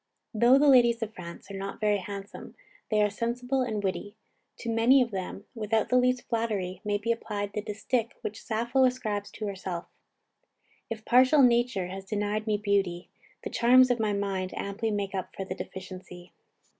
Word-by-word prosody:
Though 240 Hz, +4 st, +6 dB
the 290 Hz, +1 st, +4 dB
ladies 240 Hz, -3 st, +5 dB
of 220 Hz, 0 st, -6 dB
France 170 Hz, +1 st, -10 dB
are -, -, -6 dB
not 195 Hz, 0 st, -5 dB
very 210 Hz, -2 st, +2 dB
handsome, 200 Hz, +1 st, -8 dB, 0.3 s
they 215 Hz, -1 st, +3 dB
are 210 Hz, -, +3 dB
sensible 245 Hz, +4 st, -1 dB
and 215 Hz, -5 st, -2 dB
witty. 205 Hz, +2 st, -3 dB, 0.4 s
To 235 Hz, -, -5 dB
many 230 Hz, +4 st, +5 dB
of 245 Hz, -3 st, +1 dB
them, 195 Hz, +1 st, -5 dB
without 220 Hz, -1 st, 0 dB
the 250 Hz, -, +2 dB
least 250 Hz, 0 st, +2 dB
flattery, 205 Hz, -6 st, -2 dB
may 205 Hz, 0 st, 0 dB
be 220 Hz, +3 st, -1 dB
applied 205 Hz, -3 st, -3 dB
the 210 Hz, -, -2 dB
distich 220 Hz, +3 st, -1 dB
which 210 Hz, -, -5 dB
Sappho 235 Hz, +4 st, +1 dB
ascribes 215 Hz, -5 st, -1 dB
to 215 Hz, -, -5 dB
herself: 185 Hz, -3 st, -4 dB, 1.1 s
"_If 220 Hz, -1 st, -5 dB
partial 260 Hz, +4 st, +6 dB
nature 240 Hz, -5 st, +3 dB
has 190 Hz, +2 st, -7 dB
denied 210 Hz, +1 st, -2 dB
me 210 Hz, -1 st, +2 dB
beauty, 195 Hz, -4 st, 0 dB, 0.3 s
the -, -, -5 dB
charms 255 Hz, +2 st, +5 dB
of 245 Hz, -, +1 dB
my 215 Hz, -1 st, +1 dB
mind 195 Hz, -2 st, -2 dB
amply 205 Hz, +3 st, -2 dB
make 205 Hz, -2 st, -2 dB
up 190 Hz, -1 st, -4 dB
for 195 Hz, -, -4 dB
the 185 Hz, -, -4 dB
deficiency. 185 Hz, -2 st, -9 dB
210 Hz, 180 wpm, -28 LUFS, 195-235 Hz, 1.1 s, Though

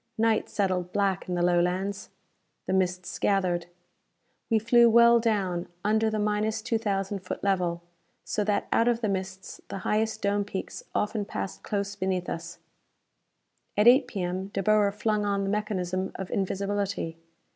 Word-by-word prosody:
Night 225 Hz, 0 st, +2 dB
settled 185 Hz, -3 st, -1 dB
black 195 Hz, -2 st, 0 dB
in 180 Hz, -, -1 dB
the 175 Hz, -, +1 dB
Lowlands. 180 Hz, +3 st, 0 dB, 0.6 s
The -, -, -1 dB
mists 180 Hz, -1 st, -1 dB
gathered. 180 Hz, -4 st, +1 dB, 0.8 s
We 225 Hz, -, +4 dB
flew 235 Hz, +2 st, +5 dB
well 235 Hz, +1 st, +7 dB
down 195 Hz, -6 st, 0 dB, 0.2 s
under 220 Hz, +1 st, +3 dB
the 215 Hz, -, -2 dB
minus 210 Hz, +1 st, 0 dB
two 230 Hz, -2 st, 0 dB
thousand 200 Hz, -2 st, -1 dB
foot 185 Hz, -, -6 dB
level 180 Hz, -3 st, 0 dB, 0.4 s
so 210 Hz, -, -1 dB
that 205 Hz, -1 st, 0 dB
out 230 Hz, -, +3 dB
of 240 Hz, -1 st, +2 dB
the 220 Hz, -, +1 dB
mists 190 Hz, -1 st, -5 dB
the -, -, -5 dB
highest 220 Hz, +1 st, 0 dB
dome 205 Hz, 0 st, +2 dB
peaks 195 Hz, -1 st, -6 dB
often 210 Hz, 0 st, 0 dB
passed 95 Hz, -, -5 dB
close 200 Hz, -, -3 dB
beneath 190 Hz, -2 st, -2 dB
us. 170 Hz, +1 st, -6 dB, 1.2 s
At 210 Hz, +2 st, +5 dB
8 255 Hz, +2 st, +7 dB
P.M. 190 Hz, -4 st, -3 dB
De 195 Hz, -1 st, -3 dB
Boer 210 Hz, 0 st, +4 dB
flung 210 Hz, 0 st, 0 dB
on 200 Hz, -1 st, 0 dB
the 195 Hz, -, -1 dB
mechanism 190 Hz, -3 st, -2 dB
of 190 Hz, -, -6 dB
invisibility. 195 Hz, -3 st, -2 dB
200 Hz, 155 wpm, -27 LUFS, 185-215 Hz, 1.2 s, well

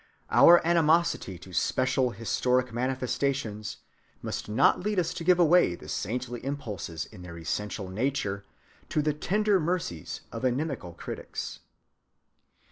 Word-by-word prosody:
Our 175 Hz, -1 st, +7 dB
animosity 165 Hz, -, +2 dB
to 90 Hz, +2 st, -13 dB
special 130 Hz, +7 st, +1 dB
historic 125 Hz, +3 st, 0 dB
manifestations 125 Hz, -3 st, -2 dB, 0.5 s
must -, -, -4 dB
not 115 Hz, +6 st, +4 dB
lead 210 Hz, +2 st, -2 dB
us 170 Hz, -2 st, +1 dB
to -, -, -5 dB
give 180 Hz, +1 st, +5 dB
away 175 Hz, -, +5 dB
the -, -, -13 dB
saintly 120 Hz, +2 st, -3 dB
impulses 105 Hz, -, -4 dB
in 105 Hz, -5 st, -13 dB
their 85 Hz, -1 st, -9 dB
essential 100 Hz, +4 st, -3 dB
nature 100 Hz, -1 st, -2 dB, 0.5 s
to 150 Hz, -, +1 dB
the 150 Hz, 0 st, +1 dB
tender 205 Hz, +6 st, +2 dB
mercies 160 Hz, -, -3 dB
of -, -, -6 dB
inimical 130 Hz, -, -1 dB
critics. -, -, -6 dB
130 Hz, 125 wpm, -28 LUFS, 105-160 Hz, 0.5 s, Our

